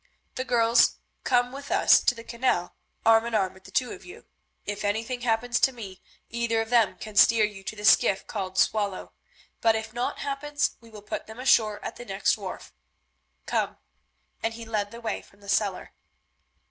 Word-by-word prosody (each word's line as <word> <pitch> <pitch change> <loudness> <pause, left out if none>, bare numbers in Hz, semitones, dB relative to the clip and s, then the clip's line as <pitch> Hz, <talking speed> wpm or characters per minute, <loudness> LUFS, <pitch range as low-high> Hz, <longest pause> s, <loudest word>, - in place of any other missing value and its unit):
The 255 - -3
girls 235 -1 +4 0.3
come 245 -1 +2
with 280 +1 -9
us - - +5
to 245 - +2
the 230 - -10
canal, 235 -7 -1 0.3
arm 225 0 +6
in 235 - -2
arm 190 -3 +1
with 190 0 -19
the - - -12
two 250 +4 0
of - - -9
you. 385 +5 -13 0.4
If 205 0 -4
anything 225 +5 -2
happens 240 +1 0
to 265 - +4
me 200 -7 -10 0.3
either 235 -1 -1
of 225 +1 -3
them 215 -6 +3
can 215 +3 -9
steer 220 +1 +6
you 205 -2 -8
to 215 - -5
the 210 0 -6
skiff 195 -1 +4
called 190 -3 -5
Swallow, 200 -1 0 0.5
but 225 -1 +4
if 220 0 -4
naught 240 +1 -2
happens 290 +1 -1
we 230 - -16
will 210 -2 -12
put 210 - -5
them 220 +2 -11
ashore 220 -5 +3
at - - -6
the 240 - -9
next 195 -2 +1
wharf. - - -8 0.7
Come," - - -1 0.6
and 225 0 -2
he 230 0 -8
led 210 -2 -2
the 235 +2 -11
way 225 - -3
from 200 - -23
the 200 - -16
cellar. 200 -2 0
225 Hz, 195 wpm, -26 LUFS, 205-240 Hz, 0.7 s, arm